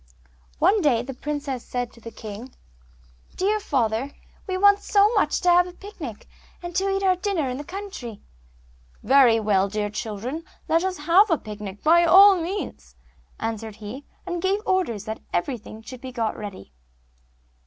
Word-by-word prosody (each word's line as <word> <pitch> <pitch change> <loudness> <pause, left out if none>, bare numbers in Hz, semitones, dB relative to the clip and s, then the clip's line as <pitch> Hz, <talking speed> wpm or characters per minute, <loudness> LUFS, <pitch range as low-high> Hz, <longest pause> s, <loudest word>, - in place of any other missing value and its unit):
One 420 0 +3
day 250 -7 +2
the 270 +2 -6
princesses 280 -2 -4
said 245 -1 -2
to 230 - -17
the 230 - -8
king, 220 +3 -9 0.8
'Dear 415 +3 +1
father, 255 - 0 0.4
we 375 -1 -1
want 405 +1 +5
so 410 +2 +3
much 410 - +2
to 360 - +3
have 355 +1 +5
a 360 - -10
picnic, 350 - -9 0.4
and 345 0 -6
eat 390 0 0
our 375 -1 +4
dinner 365 -5 -1
in 250 0 -3
the - - -5
country.' 345 - -7 0.8
'Very 250 -2 +5
well, 200 -2 +2
dear 210 0 -2
children, 225 +8 -5 0.2
let 330 +2 +2
us 375 -1 -2
have 345 +8 +4
a 330 - +3
picnic 210 -3 -8
by 340 +2 +6
all 385 +4 +8
means,' 330 - -5 0.4
answered 225 -1 -4
he, 220 +6 -8 0.2
and 350 -2 -3
gave 390 +2 +1
orders 340 - 0
that 220 0 -5
everything 220 +2 -3
should 250 +1 -10
be 260 - -7
got 230 -3 -2
ready. 195 - -9
275 Hz, 165 wpm, -24 LUFS, -, 0.8 s, all